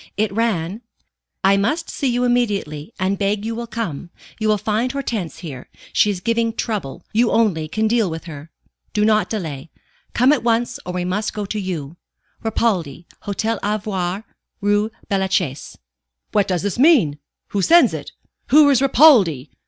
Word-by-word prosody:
It 215 -1 +1
ran: 210 -3 -1 0.6
"I 195 +1 +5
must 300 +12 0
see 280 - -2
you 245 0 +1
immediately, 205 -12 -1
and 190 +1 0
beg 205 +1 0
you 225 - -2
will 235 +1 -5
come. 195 -9 -5 0.3
You 220 - 0
will 215 0 +3
find 220 +5 -1
Hortense 235 - -4
here. 130 -5 -8 0.2
She 210 - +4
is 190 -3 -3
giving 230 +1 0
trouble. 190 - -4
You 230 +2 +3
only 190 -9 +1
can 220 +7 0
deal 225 -3 +2
with 160 0 -6
her. 155 -2 -9 0.4
Do 210 -1 +2
not 215 -1 +2
delay. 160 -8 -5 0.5
Come 255 +4 +5
at 295 - 0
once, 235 0 0
or 180 - -3
we 180 -1 -2
must 205 +4 -2
go 210 -1 -3
to 210 +2 -3
you. 170 -5 -5 0.5
Ripaldi, 185 - -1 0.2
Hôtel 220 +3 -1
Ivoire, 200 -2 -2 0.4
Rue 205 +1 +1 0.2
Bellechasse." 190 -7 -1 0.5
"What 205 -2 +2
does 180 -2 -1
this 205 +3 -2
mean? 250 - +4 0.3
Who 200 - -1
sends 340 - +5
it? - - -6 0.4
Who 300 0 +6
is 265 -2 +3
Ripaldi?" 235 - +5
205 Hz, 165 wpm, -20 LUFS, 180-230 Hz, 0.6 s, Who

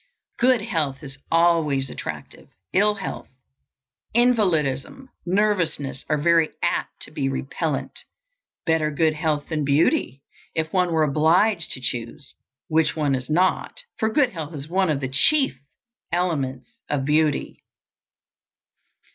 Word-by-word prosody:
Good 250 -2 +4
health 155 - -2
is 140 -1 -10
always 160 -6 +2
attractive; - - -8 0.2
ill 210 +2 +3
health, 195 -3 -6 0.9
invalidism, 215 - +1 0.2
nervousness, 170 -9 0
are 150 - +2
very 165 +1 +3
apt - - -2
to - - -10
be 135 -2 -1
repellant. 135 +2 -3 0.6
Better 160 -2 +2
good 155 +1 +1
health 155 -2 -1
than 155 -2 -1
beauty, 140 -2 +1 0.3
if 160 0 -2
one 180 -2 +2
were 160 -1 +3
obliged 165 +5 +2
to 130 - -4
choose 125 +4 -4 0.3
which 160 -1 +2
one 150 -3 +1
is 130 +1 -3
not, 185 - +1 0.2
for 220 - +2
good 270 -1 +3
health 160 -4 -6
is 140 0 -7
one 185 +1 +1
of 145 -2 0
the 130 - -1
chief 265 - +3 0.5
elements 165 - -2
of 140 -2 -1
beauty. 150 0 +1
160 Hz, 130 wpm, -23 LUFS, 140-185 Hz, 0.9 s, Good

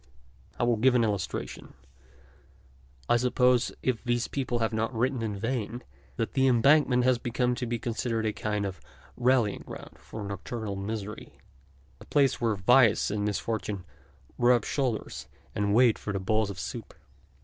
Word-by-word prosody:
I - - +1
will 120 -1 +2
give 125 +3 +4
an 120 - +4
illustration. 100 -4 -3 1.3
I 120 - +4
suppose, 125 0 +3
if 125 -3 0
these 120 -1 0
people 130 -3 -2
have 115 -1 -1
not 110 +2 0
written 125 +2 0
in 105 -3 -3
vain, 115 +1 -3 0.3
that 115 - -2
the 135 -1 +3
Embankment 130 +1 +4
has 125 -1 +3
come 125 +1 0
to 125 0 -3
be 120 0 -1
considered 115 0 -2
a 110 - 0
kind 105 -1 -2
of 95 -2 -6 0.3
rallying 120 -4 +2
ground - - -10
for 110 - -8
nocturnal 100 +1 -5
misery, 105 +1 -6 0.6
a - - -13
place 140 -4 +2
where 115 -3 +2
vice 110 +2 +4
and 105 0 -1
misfortune 105 -2 -2 0.5
rub 120 -2 +4
shoulders 130 -6 -2 0.3
and 100 0 +1
wait 120 -2 +5
for 100 -2 -3
bowls 110 +2 0
of 100 - -6
soup. - - -6
115 Hz, 155 wpm, -28 LUFS, 105-125 Hz, 1.3 s, wait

